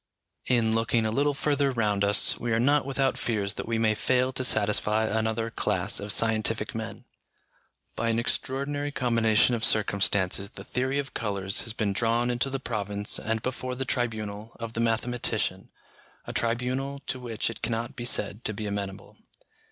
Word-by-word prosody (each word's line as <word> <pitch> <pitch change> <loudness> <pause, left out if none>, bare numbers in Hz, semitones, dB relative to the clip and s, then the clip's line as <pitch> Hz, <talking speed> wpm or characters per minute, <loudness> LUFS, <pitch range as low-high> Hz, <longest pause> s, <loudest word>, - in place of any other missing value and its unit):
In 115 -3 +3
looking 115 0 +2
a 110 - 0
little 145 +4 +1
further 145 -1 +2
round 105 -5 +1
us, 100 0 +3
we 120 - -2
are 110 - +2
not 140 +3 +3
without 135 -1 +1
fears 105 -3 -1
that - - -6
we 115 0 0
may 110 -1 +3
fail 130 +4 +1
to 130 - 0
satisfy 105 -1 +3
another 110 +1 -1
class 100 0 0
of 100 0 -3
scientific 110 0 +1
men. - - -6 0.9
By 115 0 0
an 115 - +1
extraordinary 140 +4 -1
combination 115 -3 +3
of 115 -2 -1
circumstances 100 -2 +2
the - - -10
theory 130 +2 -1
of 140 0 -3
colours 100 -4 0
has 115 - -3
been 105 -3 0
drawn 120 +3 +1
into 120 +3 0
the 135 0 -3
province 105 -4 -2
and 110 0 -2
before 130 0 -3
the 135 +1 -3
tribunal 110 -3 -3
of 115 -1 -5
the 115 - -3
mathematician, 115 +1 0 0.6
a - - -6
tribunal 130 +4 -1
to 130 - -3
which 115 -2 -2
it 115 - -11
cannot 120 +3 -2
be 120 -2 -5
said 115 -2 0
to 110 - -2
be 110 - -4
amenable. 100 -1 -5
115 Hz, 175 wpm, -27 LUFS, 110-125 Hz, 0.9 s, In